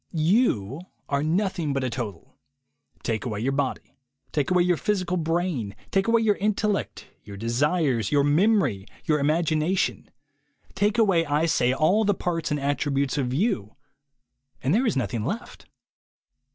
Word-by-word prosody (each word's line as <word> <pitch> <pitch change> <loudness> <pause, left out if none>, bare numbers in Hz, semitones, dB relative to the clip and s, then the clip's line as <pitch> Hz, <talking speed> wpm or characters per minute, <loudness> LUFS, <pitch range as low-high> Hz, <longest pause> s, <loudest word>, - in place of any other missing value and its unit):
You 160 - +1 0.3
are 140 0 +1
noth 185 +5 0
ing 150 -4 -1
but 135 -1 -1
a 130 - 0
total. 115 -5 -6 0.7
Take 110 -3 -1
away 110 -4 -3
your 130 +4 0
body, 135 -1 -3 0.3
take 145 -3 0
away 180 -1 +4
your 180 0 +2
physical 185 -1 -1
brain, 165 - -1 0.2
take 195 +1 +1
away 230 0 +4
your 215 -2 +2
intellect, 210 0 -1 0.2
your 100 -1 -10
desires, 125 - 0
your 145 -1 +4
memory, 145 - +2 0.2
your 150 -1 +2
imagination, 155 +4 0 0.6
take 205 +3 +1
away, 195 -7 +4
I 150 +2 +1
say, 125 -6 +2
all 155 +11 +3
the 205 -1 +2
parts 165 -4 -2
and 150 - -1
attributes 140 0 0
of 125 -2 -1
you, 130 - -1 0.9
and 135 +5 +2
there 240 +5 +2
is 215 - 0
nothing 120 -3 -2
left. 210 - -5
155 Hz, 150 wpm, -25 LUFS, 130-190 Hz, 0.9 s, away